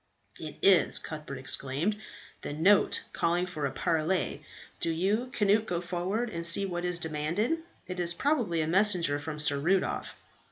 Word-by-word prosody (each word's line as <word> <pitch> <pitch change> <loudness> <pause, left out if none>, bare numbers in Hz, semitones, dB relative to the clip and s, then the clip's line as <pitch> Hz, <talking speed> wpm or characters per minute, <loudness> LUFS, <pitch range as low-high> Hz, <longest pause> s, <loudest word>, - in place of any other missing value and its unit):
"It 155 -2 -8
is," 190 -2 +5
Cuthbert 150 -3 -6
exclaimed, 135 +8 -1 0.5
"the - - -5
note 185 +7 +3
calling 175 +2 +1
for 155 -6 -3
a - - -6
parley. 165 +3 -1 0.4
Do - - 0
you, 200 +9 0
Cnut, 210 +1 +2
go 175 - -1
forward, 185 +7 -3
and 170 -1 -5
see 170 +4 +5
what 175 -2 -4
is 180 -1 -1
demanded. 170 - -2 0.3
It 180 0 -6
is 175 -1 +1
probably 235 - 0
a 155 - -1
messenger 175 -5 +3
from 150 +1 -6
Sir 145 -2 +3
Rudolph." 180 +6 -1
175 Hz, 160 wpm, -29 LUFS, 155-195 Hz, 0.5 s, is